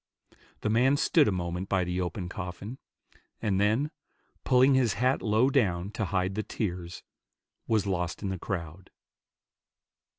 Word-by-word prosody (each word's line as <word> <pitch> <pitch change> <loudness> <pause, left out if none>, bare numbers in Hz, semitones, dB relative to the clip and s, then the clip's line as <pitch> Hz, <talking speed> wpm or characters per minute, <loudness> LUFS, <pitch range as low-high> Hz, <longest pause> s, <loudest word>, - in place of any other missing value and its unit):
The 105 - 0
man 130 +5 +4
stood 150 0 +4
a - - +2
moment 90 +1 -3
by 95 -2 +2
the 90 +1 -2
open 90 +1 -3
coffin, 100 +5 -6 0.6
and 100 -3 0
then, 115 +9 +2 0.5
pulling 130 +1 +5
his 125 -6 +3
hat 130 +2 +1
low 110 +5 +3
down 95 -8 +1
to 110 0 -2
hide 95 -1 0
the 110 - -1
tears, 90 -5 -4 0.6
was 110 -3 +2
lost 90 -1 -2
in 100 - -1
the 95 -2 -3
crowd. 90 -2 -5
100 Hz, 145 wpm, -28 LUFS, 90-115 Hz, 0.6 s, pulling